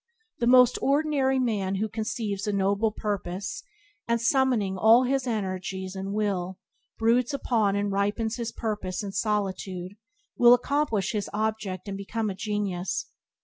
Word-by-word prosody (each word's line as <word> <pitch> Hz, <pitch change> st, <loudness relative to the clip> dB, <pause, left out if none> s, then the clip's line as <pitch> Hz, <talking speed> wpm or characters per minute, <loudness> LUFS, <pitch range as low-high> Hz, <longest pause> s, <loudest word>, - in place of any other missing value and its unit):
The 235 Hz, -, +1 dB
most 250 Hz, 0 st, +6 dB
ordinary 280 Hz, -2 st, +2 dB
man 205 Hz, -7 st, 0 dB
who 210 Hz, +3 st, -1 dB
conceives 215 Hz, -2 st, -3 dB
a -, -, +1 dB
noble 200 Hz, +2 st, +1 dB
purpose, 200 Hz, -3 st, -4 dB, 0.5 s
and, 235 Hz, 0 st, +1 dB
summoning 235 Hz, -5 st, +2 dB
all 225 Hz, +6 st, +6 dB
his 265 Hz, +1 st, 0 dB
energies 190 Hz, -3 st, -3 dB
and 195 Hz, +1 st, -4 dB
will, 190 Hz, -3 st, -1 dB, 0.4 s
broods 240 Hz, +4 st, +2 dB
upon 220 Hz, -7 st, +1 dB
and 200 Hz, 0 st, 0 dB
ripens 205 Hz, +3 st, -1 dB
his 230 Hz, -1 st, -3 dB
purpose 210 Hz, -5 st, -3 dB
in 200 Hz, -, -4 dB
solitude 195 Hz, -3 st, -2 dB, 0.4 s
will 240 Hz, 0 st, +7 dB
accomplish 245 Hz, -5 st, 0 dB
his 210 Hz, -3 st, -3 dB
object 210 Hz, -3 st, -2 dB
and 200 Hz, -, -4 dB
become 210 Hz, +2 st, -3 dB
a -, -, -6 dB
genius. 205 Hz, -, -3 dB
210 Hz, 145 wpm, -26 LUFS, 195-235 Hz, 0.5 s, will